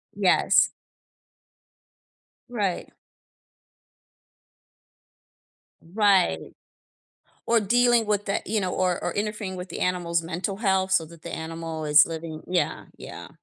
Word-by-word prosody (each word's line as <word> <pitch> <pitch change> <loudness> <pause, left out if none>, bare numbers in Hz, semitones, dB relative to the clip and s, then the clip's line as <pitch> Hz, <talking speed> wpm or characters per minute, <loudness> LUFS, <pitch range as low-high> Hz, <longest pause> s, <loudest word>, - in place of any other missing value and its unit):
Yes. - - +4 1.8
Right. 205 -7 -2 2.9
Right. 185 - +1 0.9
Or 230 0 +4
dealing 240 +2 +3
with 205 0 0
that 200 - -2
you 215 0 0
know, 185 -1 -2
or 180 -2 0
or - - -2
interfering 210 -2 -3
with 180 +1 -7
the - - -6
animal's 175 -2 0
mental 180 +4 -4
health 190 -3 +1
so 165 -4 +3
that 165 0 -15
the 170 - -7
animal 160 -1 -5
is 150 0 +6
living 160 -1 -6
Yeah, 180 0 -1
yeah. - - -9
185 Hz, 110 wpm, -25 LUFS, 165-205 Hz, 2.9 s, is